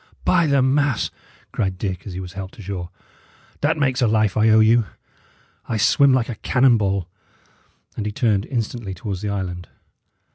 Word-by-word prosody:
"By 170 -3 +3
the 140 -2 +3
mass!" 140 -2 +1 0.4
cried 95 -4 -2
Dick, 95 -1 -4
as 95 - -6
he 90 - -5
was 90 -1 -8
helped 95 -1 -8
ashore, 95 -3 -6 0.7
"that 155 +2 +1
makes 135 -3 0
a 120 - +4
life 110 -2 +2
I 110 +1 +3
owe 110 0 +6
you. 110 0 +4 0.8
I 110 - 0
swim 125 +6 +4
like 130 -3 +2
a 120 - -4
cannon 125 -1 +4
ball." 100 -3 -1 0.9
And 105 - -3
he - - -2
turned 105 -3 0
instantly 115 -5 -4
towards 95 0 -5
the 105 - -3
island. 90 -3 -4
110 Hz, 175 wpm, -21 LUFS, 95-125 Hz, 0.9 s, owe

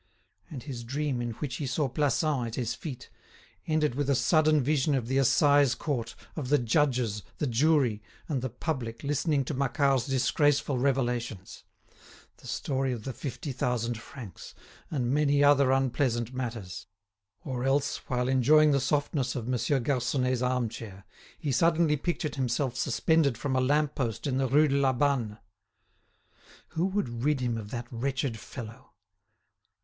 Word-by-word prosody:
And 135 -5 -7
his 130 -5 -6
dream, 135 +1 -2
in 120 -1 -3
which 130 +1 -5
he 145 - -3
saw 135 +3 0
Plassans 145 -1 0
at 115 - -6
his 120 -2 -2
feet, 130 +2 -8 0.6
ended 155 -4 +1
with 140 +2 -1
a 140 - +4
sudden 155 +2 +3
vision 145 +1 +2
of 125 -4 -2
the 135 +2 +1
Assize 140 0 +4
Court, 120 -7 -3 0.2
of 140 -6 -4
the 145 - +5
judges, 120 -4 +1 0.2
the - - -1
jury, 130 -3 +2 0.3
and 140 -6 -1
the 130 - -2
public 125 -2 -4
listening 145 0 0
to 150 - -3
Macquart's 135 -1 +1
disgraceful 135 +1 +2
revelations; 120 -7 -2 0.7
the - - -14
story 135 -1 -1
of 120 -4 -4
the 130 - -4
fifty 135 +2 -5
thousand 125 -2 -1
francs, 120 -5 -10 0.3
and 125 -5 -1
many 145 -1 +3
other 140 -2 +5
unpleasant 130 -2 0
matters; 115 -9 -5 0.6
or 125 -3 -3
else, 135 +1 +1
while 125 -1 0
enjoying 150 +4 +5
the 140 - +3
softness 140 -1 0
of 120 -3 -4
Monsieur 130 +3 +1
Garconnet's 125 0 0
arm 125 -1 +1
chair, 100 -3 -9 0.3
he 145 - -3
suddenly 165 +2 +3
pictured 155 -1 -3
himself 125 0 -1
suspended 150 -3 +2
from 135 +1 -2
a 130 - +3
lamp 145 +3 +2
post 120 -4 -3
in 135 -2 0
the 135 - +1
Rue 150 +4 +4
de 140 -1 +1
la 135 -1 +3
Banne. 125 -6 0 1.3
Who 165 +3 0
would 125 - -2
rid 150 -1 +2
him 120 -2 -1
of 110 -2 -6
that 120 +1 -4
wretched 130 -1 -2
fellow? 115 -1 -10
130 Hz, 160 wpm, -28 LUFS, 120-145 Hz, 1.3 s, the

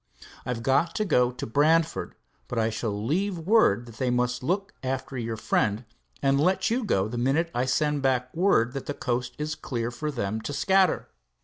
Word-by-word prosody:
I've 120 -2 -3
got 135 +7 +2
to 215 - 0
go 125 -9 +3
to 125 - -6
Brantford, 155 +6 +1 0.3
but 125 - -5
I 115 0 +1
shall 110 -2 -3
leave 185 - 0
word 165 - +3
that 115 -1 -13
they 130 -2 0
must 125 0 0
look 190 +9 -1
after 130 +1 -3
your 115 -2 -3
friend, 110 +1 0 0.4
and 140 0 +3
let 190 +7 +2
you 245 +2 +1
go 100 - +1
the 120 +2 -4
minute 145 +7 +1
I 125 +1 0
send 150 +2 +1
back 130 -1 0
word 160 - +3
that 135 - -5
the 145 - -3
coast 125 -1 -2
is 150 +1 -2
clear 120 -5 -3
for 150 +5 -4
them 110 -5 -3
to 145 - -5
scatter." 190 +4 +2
130 Hz, 195 wpm, -26 LUFS, 120-160 Hz, 0.4 s, go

